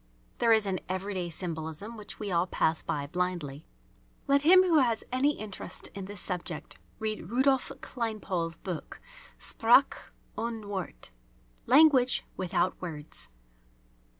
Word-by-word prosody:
There 230 - +4
is 220 -2 +5
an 190 -2 -1
everyday 185 -1 -2
symbolism 165 +5 -5
which 210 -2 -9
we 205 -3 -3
all 170 +1 +2
pass 160 -2 +1
by 145 -1 -2
blindly. 165 -3 -3 0.6
Let 280 0 +4
him 370 +5 +7
who 335 -4 +4
has 235 -4 +2
any 280 +4 +2
interest 210 -3 -5
in 195 -1 -6
this 205 0 -8
subject 180 -4 -5 0.2
read 215 -5 -4
Rudolph 265 +2 +2
Kleinpaul's 200 -8 -3
book, 180 -5 -6 0.4
"Sprache 240 +4 +3 0.2
ohne 225 -2 -4
Worte" 190 - -6 0.6
(Language 265 -2 +5
without 185 0 0
Words). 155 - -6
200 Hz, 125 wpm, -29 LUFS, 175-235 Hz, 0.6 s, him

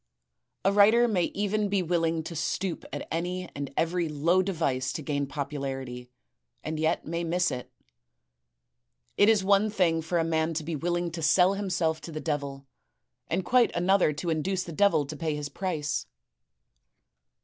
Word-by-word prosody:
A 195 - +5
writer 220 +4 +6
may 185 -7 +1
even 205 +1 -1
be 195 -2 +1
willing 165 -1 0
to 170 - -7
stoop 180 +3 -3
to - - -5
any 180 +2 -2
and 140 -1 -5
every 170 0 0
low 165 +5 +2
device 160 -9 -1
to 155 - -5
gain 140 0 -1
popularity, 135 -4 -5 0.5
and 155 0 -3
yet 160 +1 0
may 170 +2 -2
miss 175 0 +1
it. 125 -1 -6 1.4
It 205 - +5
is 215 -3 +4
one 200 +2 +4
thing 175 -6 +2
for 170 +2 -1
a 165 - +2
man 160 0 0
to 155 - -2
be 160 +1 -3
willing 175 +2 -1
to 165 0 -5
sell 180 +5 +4
himself 180 -5 -1
to 165 - -8
the 155 - -5
devil, 140 -3 -3 0.6
and 180 +2 -1
quite 250 +2 +4
another 180 -1 +3
to 160 +3 -3
induce 180 +4 -1
the 170 - -8
devil 200 -3 +3
to - - -7
pay 160 -2 -2
his 145 -1 -4
price. 155 - -2
165 Hz, 170 wpm, -28 LUFS, 150-185 Hz, 1.4 s, writer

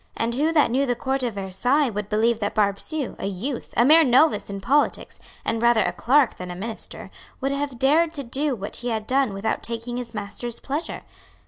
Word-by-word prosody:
And 230 +1 -1
who 300 +6 +1
that 300 -7 +4
knew 270 +3 +1
the 245 - +1
Court 265 +3 -1
of 240 -4 -2
Versailles 235 +9 +1
would 210 0 -4
believe 225 +1 +2
that 205 -2 -2
Barbesieux, 215 +8 -1
a - - -3
youth, 230 +7 -4
a 235 - +5
mere 320 +4 +7
novice 255 -4 +3
in 200 0 -5
politics, 275 +9 0 0.3
and 225 0 -1
rather 235 -2 +4
a - - 0
clerk 270 +1 +2
than 180 0 -7
a 175 - -5
minister, 220 +5 -6 0.3
would 270 0 -1
have 280 -2 -3
dared 305 +6 +3
to 280 - -3
do 270 +3 -1
what 200 -2 -5
he 245 - -6
had 220 -2 -2
done 265 -1 +1
without 195 +3 -2
taking 235 +1 -4
his 240 -2 -6
master's 215 +3 -5
pleasure? 290 +5 -4
240 Hz, 210 wpm, -24 LUFS, 215-275 Hz, 0.3 s, mere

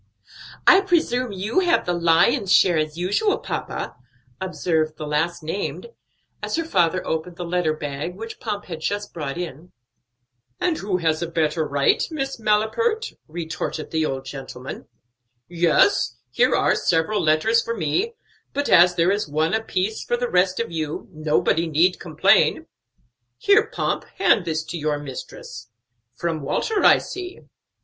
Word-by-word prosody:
"I 380 - +8
presume 255 - +1
you 200 - 0
have 350 -2 +2
the 175 - 0
lion's 175 +6 +3
share 185 -2 +5
as 155 +1 -2
usual, 205 - +1
papa," - - -5 0.5
observed 160 -4 -1
the 155 - -5
last 160 +3 -1
named, 195 - -4 0.5
as - - -2
her 330 - 0
father 185 - +1
opened 160 +2 -3
the 175 - -5
letter 170 -2 0
bag 150 +3 -5
which 225 +3 -8
Pomp 210 -4 -4
had 165 -4 -6
just 205 +4 -3
brought 150 -3 -4
in. 175 -1 -7 0.9
"And 340 -3 0
who 195 -2 -1
has 160 -2 0
a 170 - -1
better 160 -1 0
right, 140 -1 +2
Miss 270 -5 -4
Malapert?" 225 - +1
retorted 160 -1 -5
the 160 -1 +1
old 135 -3 -3
gentleman. 135 -1 -8 0.6
"Yes, 175 - +2
here - - +3
are - - +3
several 180 +5 +1
letters 165 +9 +3
for 230 0 -4
me; 295 - -1 0.4
but 285 0 -1
as 180 +1 +6
there 170 +2 +3
is 205 -2 -1
one 155 +4 0
apiece 220 -1 -1
for 240 - -1
the 245 0 -1
rest 185 +1 +2
of 230 - -2
you, 155 -2 -4
nobody 155 +1 +1
need 165 +4 +2
complain. 155 -3 +3 0.7
Here, 420 +2 +4
Pomp, - - -2
hand 220 - +3
this 160 -1 -1
to 165 +1 -6
your 150 -1 0
mistress. 130 -4 -9 0.5
From 165 +2 -2
Walter, 400 - -1
I - - +7
see." 370 -1 -7
175 Hz, 155 wpm, -23 LUFS, 155-220 Hz, 0.9 s, I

